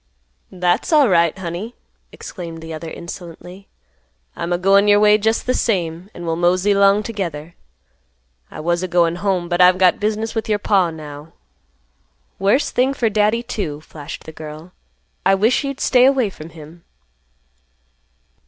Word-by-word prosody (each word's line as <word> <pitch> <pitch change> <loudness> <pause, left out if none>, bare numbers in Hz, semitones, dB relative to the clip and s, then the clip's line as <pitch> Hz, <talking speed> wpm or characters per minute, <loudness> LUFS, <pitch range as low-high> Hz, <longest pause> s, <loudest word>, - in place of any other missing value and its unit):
"That's 180 - 0
alright, 190 - +4
honey," 190 +6 -6 0.4
exclaimed 165 -4 -9
the 160 0 -7
other 160 +1 -7
insolently. 175 +2 -10 0.7
"I'm 170 - -4
a 175 - +2
goin' 195 +3 +4
your 205 0 +5
way 210 0 +5
just 220 +3 0
th' 255 - +1
same; 175 -4 -1
an' 175 - -8
we'll 165 -1 -1
mosey 180 +4 +2
'long 200 +1 +4
t'gether. 170 -8 -5 1.0
I - - -8
was 175 +2 0
a 185 - -2
goin' 170 -1 +1
home, 185 -2 -1
but 175 +1 0
I've 180 0 +6
got 185 -1 +3
business 215 +1 -2
with 225 -1 -3
your 210 - +2
paw 195 -3 +2
now." 150 -1 -10 1.1
"Worse 200 +9 +2
thing 260 +2 +1
for 230 -4 0
Daddy, 215 +3 +1
too," 180 -11 -4
flashed 150 -2 -10
the - - -10
girl. 155 +2 -10 0.5
"I 195 +1 +4
wish 220 +9 +2
you'd 275 -1 -4
stay 250 -1 +4
away 260 -6 +2
from 155 -2 -11
him." 165 +1 -14
185 Hz, 155 wpm, -19 LUFS, 170-210 Hz, 1.1 s, I've